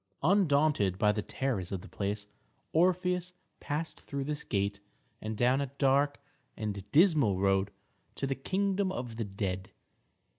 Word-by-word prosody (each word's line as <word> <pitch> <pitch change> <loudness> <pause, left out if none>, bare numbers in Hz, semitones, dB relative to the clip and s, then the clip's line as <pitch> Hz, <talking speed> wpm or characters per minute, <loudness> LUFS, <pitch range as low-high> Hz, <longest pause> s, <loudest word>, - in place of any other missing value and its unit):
Undaunted 145 - +3
by 105 +1 +4
the 105 0 -1
terrors 110 -7 -2
of 95 -2 -3
the - - -11
place, 100 +1 -3 0.5
Orpheus 180 +1 +2 0.3
passed 155 +3 -4
through 140 -1 -4
this 150 +1 -3
gate 100 0 -1 0.4
and 110 0 -4
down 125 +4 +3
a 140 - -1
dark 140 +1 +3 0.4
and 105 -3 -3
dismal 150 - +5
road 95 0 +2 0.5
to - - -2
the 135 - 0
kingdom 190 +6 0
of 120 -9 -5
the 115 - -1
dead. 95 -1 -3
135 Hz, 145 wpm, -31 LUFS, 100-155 Hz, 0.5 s, dismal